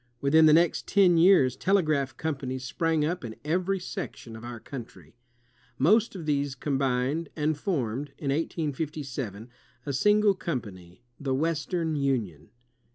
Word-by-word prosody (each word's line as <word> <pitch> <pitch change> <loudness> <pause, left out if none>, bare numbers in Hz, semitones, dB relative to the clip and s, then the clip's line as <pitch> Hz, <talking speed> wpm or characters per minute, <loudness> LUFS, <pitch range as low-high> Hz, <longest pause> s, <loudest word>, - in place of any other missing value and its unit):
Within 155 +4 +5
the 155 - +6
next 170 +1 +3
ten 190 -4 +4
years, 165 -8 +5
telegraph 155 -6 +1
companies 130 -4 -3
sprang 160 +3 0
up 175 +1 -2
in 110 -2 -6
every 185 +5 0
section 115 -9 -7
of 110 - -10
our 120 -1 -7
country. 110 - -10 0.6
Most 210 - +3
of 170 -4 -6
these 140 -2 0
com 135 +1 -2
bined, 135 +5 0
and 155 0 0
formed, 140 - -2
in 140 -2 -2
1857, 140 - -3 0.4
a 140 - -3
single 210 +7 +4
com 170 -8 -2
pany, 95 -1 -13 0.2
the 135 -2 -1
Western 160 +2 -1
Union. 120 - -2
145 Hz, 145 wpm, -27 LUFS, 130-165 Hz, 0.6 s, the